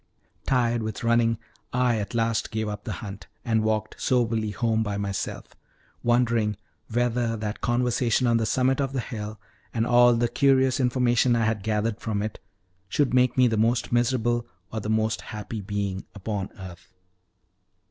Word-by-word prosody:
Tired 120 -3 +2
with 110 0 -4
running, 115 -1 +3 0.3
I 125 -2 +2
at 105 +3 -5
last 115 -1 0
gave 110 -1 -2
up 105 0 -5
the - - -3
hunt, 100 -3 -8 0.2
and 110 -2 +2
walked 110 0 -1
soberly 115 -4 +1
home 110 +1 0
by 105 -2 -2
myself, 100 -1 -4 0.5
wondering 120 -3 +2 0.3
whether 120 0 0
that 105 0 -4
conversation 120 0 +1
on 120 -1 +4
the 115 -1 0
summit 130 +3 +2
of 135 -1 -2
the 135 - -1
hill, 110 -2 -5 0.4
and 115 0 +1
all 120 0 +6
the 120 +1 +2
curious 130 0 +3
information 125 -1 +3
I 115 -1 +2
had 110 -2 0
gathered 105 +1 -1
from 105 -3 -1
it, 110 -2 -5 0.5
should 135 +3 +1
make 125 -1 +3
me 130 - +6
the 110 -2 0
most 115 +3 +1
miserable 120 -1 +1 0.3
or 110 - -1
the 105 - -5
most 110 0 +1
happy 105 0 -6
being 100 -1 -3
upon 100 -1 -3
earth. 90 -2 -11
115 Hz, 165 wpm, -26 LUFS, 110-120 Hz, 0.5 s, all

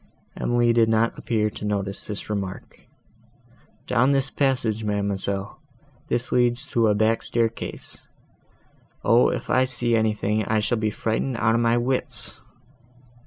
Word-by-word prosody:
Emily 120 -1 +2
did 115 -1 +4
not 115 +1 +2
appear 105 -2 -1
to - - -9
notice 100 -1 -2
this 105 -1 -5
remark. 100 -3 -6 1.0
"Down 130 +4 +3
this 135 -1 +1
passage, 125 -6 0
ma'amselle; 100 -1 -2 0.5
this 120 +1 -1
leads 120 0 +2
to 115 -2 +2
a 105 - +3
back 110 +2 +2
staircase. 115 -1 -3 1.0
O! 115 +3 +5
if - - -4
I 130 0 +4
see 120 -2 0
anything, 110 -1 +1
I 110 - +1
shall 110 +2 0
be 110 -1 +1
frightened 115 +4 -2
out 115 -1 +2
of 115 - +2
my 115 0 +3
wits!" 125 +2 -2
115 Hz, 140 wpm, -24 LUFS, 105-120 Hz, 1.0 s, O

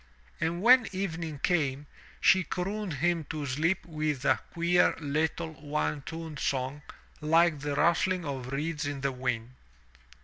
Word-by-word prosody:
And 170 +3 -1
when 250 0 +7
evening 170 -5 -3
came, 145 -5 +1 0.3
she 190 -1 +5
crooned 195 +3 -3
him 170 +3 +1
to 150 -1 -4
sleep 155 +7 0
with 155 -4 -2
a - - +4
queer, 175 +1 +3
Httle, 155 +1 -2
one 150 0 -1
toned 160 0 -7
song 135 +1 -1 0.4
like 165 0 +4
the 145 0 -2
rustling 175 +3 +2
of 130 -3 -4
reeds 150 +1 -2
in 145 -1 -4
the 140 0 0
wind. 125 -2 -3
155 Hz, 140 wpm, -29 LUFS, 140-170 Hz, 0.4 s, when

